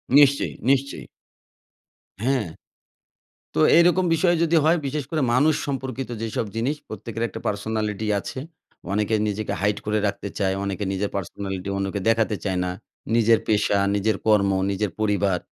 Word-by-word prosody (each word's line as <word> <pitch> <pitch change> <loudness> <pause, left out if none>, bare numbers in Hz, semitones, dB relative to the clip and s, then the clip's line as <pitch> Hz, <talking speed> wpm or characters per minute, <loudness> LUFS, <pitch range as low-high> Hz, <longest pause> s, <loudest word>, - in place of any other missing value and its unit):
নিশ্চয়ই, 140 -1 +5 0.2
নিশ্চয়ই। 140 0 +1 1.2
হ্যাঁ, 130 -6 +1 1.1
তো 80 - +1 0.2
এরকম 175 +2 +4
বিষয় 175 +2 +3
যদি 165 0 +3
হয় 165 +2 +4
বিশেষ 145 0 -2
করে 160 -2 0
মানুষ 150 +4 +4
সম্পর্কিত 135 -2 -4
যেসব 115 0 -2
জিনিস 135 +7 0
প্রত্যেকের 110 +2 -6
একটা - - -8
personality 105 0 -2
আছে। - - -7 0.5
অনেকে 105 +2 +1
নিজেকে 105 0 -3
hide 105 0 0
করে 105 0 +1
রাখতে 100 0 -3
চায় 95 -1 +1
অনেকে 100 0 -3
নিজের 100 +1 -2
personality 95 0 -5
অন্যকে 100 +1 -2
দেখাতে 115 -1 +2
চায় 95 -2 -1
না 90 - -2 0.5
নিজের 115 -1 +5
পেশা, 105 -1 +2 0.2
নিজের 105 +1 +1
কর্ম, 105 -2 +4 0.2
নিজের 100 0 -1
পরিবার। 100 -3 +1
110 Hz, 145 wpm, -23 LUFS, 100-135 Hz, 1.2 s, নিশ্চয়ই